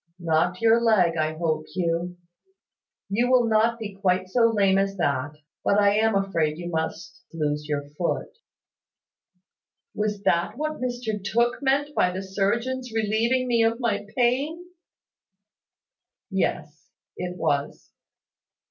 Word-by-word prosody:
"Not 170 Hz, +2 st, 0 dB
your 230 Hz, +1 st, +5 dB
leg, 195 Hz, -8 st, +3 dB
I 155 Hz, 0 st, -1 dB
hope, 155 Hz, -2 st, -1 dB
Hugh. 175 Hz, 0 st, -1 dB, 0.9 s
You 235 Hz, +5 st, +1 dB
will 255 Hz, -2 st, +4 dB
not 225 Hz, +1 st, +2 dB
be 215 Hz, -3 st, -6 dB
quite 185 Hz, -1 st, 0 dB
so 230 Hz, +3 st, +4 dB
lame 195 Hz, -3 st, +3 dB
as 195 Hz, 0 st, -1 dB
that: 145 Hz, -3 st, -1 dB, 0.3 s
but 200 Hz, -, +2 dB
I 200 Hz, 0 st, +4 dB
am 220 Hz, 0 st, +2 dB
afraid 170 Hz, -6 st, 0 dB
you 175 Hz, 0 st, -5 dB
must 160 Hz, 0 st, -4 dB
lose 150 Hz, -2 st, -2 dB
your 145 Hz, -1 st, -2 dB
foot." 150 Hz, +4 st, -3 dB, 1.6 s
"Was 210 Hz, -1 st, -2 dB
that 170 Hz, +6 st, +1 dB
what 310 Hz, 0 st, -3 dB
Mr 245 Hz, -5 st, -3 dB
Tooke 235 Hz, +6 st, +1 dB
meant 285 Hz, +2 st, +1 dB
by 180 Hz, -, +2 dB
the 190 Hz, +2 st, -5 dB
surgeon's 235 Hz, +6 st, -1 dB
relieving 225 Hz, +4 st, +1 dB
me 235 Hz, -2 st, +3 dB
of 225 Hz, +1 st, +1 dB
my 230 Hz, -4 st, -1 dB
pain?" 275 Hz, +8 st, +1 dB, 1.7 s
"Yes, -, -, -2 dB, 0.3 s
it 180 Hz, 0 st, -5 dB
was." 145 Hz, -4 st, -2 dB
200 Hz, 130 wpm, -25 LUFS, 170-235 Hz, 1.7 s, your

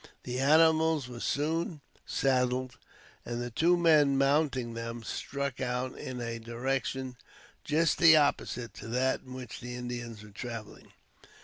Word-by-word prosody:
The 125 Hz, 0 st, -3 dB
animals 160 Hz, 0 st, +4 dB
were 120 Hz, -1 st, -8 dB
soon 160 Hz, +4 st, -1 dB, 0.3 s
saddled, 130 Hz, -1 st, +1 dB, 0.5 s
and 120 Hz, 0 st, -4 dB
the 120 Hz, 0 st, -4 dB
two 170 Hz, +9 st, +3 dB
men 150 Hz, -5 st, +5 dB
mounting 135 Hz, -3 st, +1 dB
them, 115 Hz, 0 st, -5 dB
struck 140 Hz, +4 st, -4 dB
out 125 Hz, 0 st, -2 dB
in 125 Hz, -1 st, -6 dB
a 115 Hz, -1 st, -4 dB
direction 130 Hz, +2 st, -3 dB, 0.5 s
just 160 Hz, +1 st, +2 dB
the 165 Hz, -2 st, +8 dB
opposite 135 Hz, -5 st, 0 dB
to -, -, -8 dB
that 125 Hz, +3 st, 0 dB
in 130 Hz, -1 st, -10 dB
which 125 Hz, -3 st, -7 dB
the 125 Hz, 0 st, -7 dB
Indians 120 Hz, -3 st, -6 dB
were 105 Hz, -, -13 dB
traveling. 115 Hz, 0 st, -8 dB
130 Hz, 140 wpm, -30 LUFS, 120-145 Hz, 0.5 s, the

